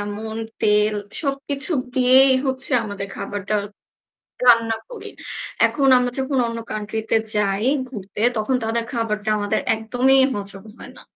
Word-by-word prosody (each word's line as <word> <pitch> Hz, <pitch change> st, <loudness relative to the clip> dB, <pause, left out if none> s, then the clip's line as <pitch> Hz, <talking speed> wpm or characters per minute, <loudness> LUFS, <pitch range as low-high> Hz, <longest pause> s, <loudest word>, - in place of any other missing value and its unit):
এমন 210 Hz, +2 st, -5 dB, 0.3 s
তেল 210 Hz, -1 st, +3 dB, 0.3 s
সবকিছু 275 Hz, +1 st, -3 dB, 0.2 s
দিয়েই 260 Hz, +1 st, +6 dB
হচ্ছে 260 Hz, +1 st, -2 dB
আমাদের 200 Hz, -2 st, -5 dB
খাবারটা 205 Hz, +1 st, -4 dB, 0.9 s
রান্না 230 Hz, -2 st, +5 dB
করি। -, -, -9 dB, 0.6 s
এখন 275 Hz, -2 st, +2 dB
আমরা 250 Hz, 0 st, 0 dB
যখন 265 Hz, +1 st, -1 dB
অন্য 230 Hz, 0 st, -4 dB
কান্ট্রি 215 Hz, +1 st, -4 dB
তে -, -, +3 dB, 0.2 s
যাই 205 Hz, +1 st, +1 dB, 0.2 s
ঘুরতে 205 Hz, -4 st, -7 dB, 0.2 s
তখন 215 Hz, +5 st, 0 dB
তাদের 230 Hz, +1 st, -1 dB
খাবারটা 215 Hz, -3 st, -2 dB
আমাদের 205 Hz, -1 st, 0 dB
একদমই 245 Hz, +4 st, +2 dB, 0.2 s
হজম 200 Hz, -1 st, -5 dB, 0.2 s
হয় -, -, -10 dB
না। -, -, -13 dB
225 Hz, 135 wpm, -21 LUFS, 210-260 Hz, 0.9 s, দিয়েই